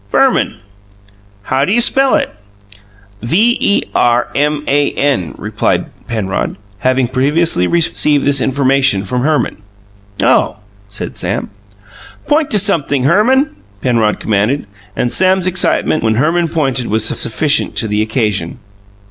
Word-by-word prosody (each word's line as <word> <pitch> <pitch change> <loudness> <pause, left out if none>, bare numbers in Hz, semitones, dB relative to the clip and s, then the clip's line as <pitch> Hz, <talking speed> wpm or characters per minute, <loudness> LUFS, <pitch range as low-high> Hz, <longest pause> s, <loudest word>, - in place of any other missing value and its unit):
"Verman." - - +1 0.9
"How 130 +5 0
d'you 205 +10 +1
spell 270 +2 +3
it?" - - -1 0.9
"V 205 - +2
e 200 - +2
r 120 0 +2
m 150 +1 0
a 145 +1 +2
n," 95 - -1
replied - - -2 0.2
Penrod, 105 -5 -3 0.2
having 130 +2 +1
previously 135 - +1
received 150 -3 +1
this 140 -1 +2
information 135 -6 +1
from 125 +5 -2
Herman. 150 +2 0 0.6
"Oh!" - - +2 0.3
said 105 - -7
Sam. - - -3 0.7
"Point 300 0 +1
to 210 - +1
sumpthing, 160 -9 +1
Herman," 245 - +2 0.3
Penrod 115 -4 +1
commanded, 110 +6 0 0.3
and 120 - -1
Sam's 185 -1 +3
excitement, 185 -3 +1
when 110 -1 +1
Herman 165 +7 +1
pointed 135 -6 -1
was 110 +1 +1
sufficient 145 +7 0
to 115 - 0
the 105 0 0
occasion. 105 -6 -2
135 Hz, 125 wpm, -14 LUFS, 115-170 Hz, 0.9 s, spell